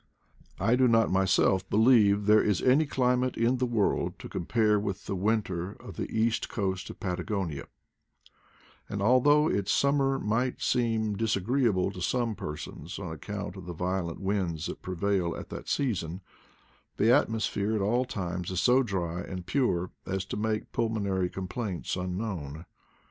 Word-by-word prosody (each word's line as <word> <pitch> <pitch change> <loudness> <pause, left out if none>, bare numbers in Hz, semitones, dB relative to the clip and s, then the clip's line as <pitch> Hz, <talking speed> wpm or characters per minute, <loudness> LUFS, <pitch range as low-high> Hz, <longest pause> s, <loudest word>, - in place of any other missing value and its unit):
I 115 - +3
do 130 0 +4
not 115 -1 +3
myself 95 0 +2
believe 105 -3 +4
there 105 +1 +6
is 105 -4 +1
any 140 +4 +3
climate 125 -1 +1
in 120 +3 +2
the 125 0 0
world 115 -4 0
to - - -9
compare 105 +3 +1
with 100 -1 -4
the 100 - -3
winter 95 -2 -1
of - - -11
the - - -4
east 115 +1 0
coast 95 -3 -2
of - - -10
Patagonia; 90 -5 -3 1.2
and 100 - -3
although 130 +8 +4
its 100 -8 0
summer 140 -1 +2
might 120 +2 -1
seem 115 -4 +1
disagreeable 110 -1 +1
to 90 - -8
some 120 +4 0
persons 75 0 -7
on 90 -5 -5
account 100 +4 -6
of 95 -2 -10
the 90 - -4
violent 90 0 -2
winds 95 -5 -1
that - - -6
prevail 95 -1 -1
at - - -8
that - - -7
season, 95 - -1 0.8
the 115 +3 +4
atmosphere 110 -5 +1
at 105 - 0
all 120 +6 +2
times 90 -7 -4
is 95 -1 -1
so 125 +2 +4
dry 90 -7 -2
and 90 -2 -6
pure 90 -5 0 0.2
as 95 0 -2
to - - -5
make 110 0 -2
pulmonary 100 -5 0
complaints 95 0 -4
unknown. 90 -5 -4
100 Hz, 155 wpm, -28 LUFS, 90-115 Hz, 1.2 s, there